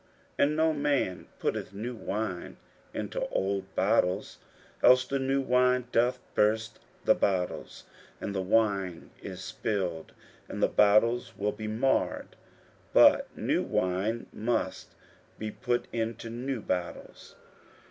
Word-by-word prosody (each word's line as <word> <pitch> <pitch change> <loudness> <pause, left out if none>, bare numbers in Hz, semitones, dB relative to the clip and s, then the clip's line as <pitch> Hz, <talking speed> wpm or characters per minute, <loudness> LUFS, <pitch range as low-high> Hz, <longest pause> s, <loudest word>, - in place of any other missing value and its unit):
41:002:022 - - -33 0.4
And 150 - -1
no 160 0 +3
man 145 -10 0
putteth - - -2
new 115 +5 -4
wine 105 -4 -4 0.3
into - - -3
old 95 0 -2
bottles: 90 +3 +1 0.4
else 130 +1 +6
the 140 +1 -1
new 135 +1 +1
wine 125 -1 +3
doth 120 +2 +2 0.2
burst 110 +1 +1 0.3
the - - +6
bottles, 90 -3 -2 0.4
and 100 - -4
the 95 - -1
wine 95 -3 0
is - - -7
spilled, 90 -6 -3 0.4
and - - -3
the - - +6
bottles 110 +4 +3
will 105 +1 0
be 110 0 -6
marred: 120 +5 0 0.6
but - - +7
new - - +1
wine 95 +6 -1
must 110 -4 -2 0.4
be 110 0 -4
put 120 +2 -1
into 115 0 -3
new 125 +1 -3
bottles. 90 -3 -5
110 Hz, 125 wpm, -29 LUFS, 95-125 Hz, 0.6 s, but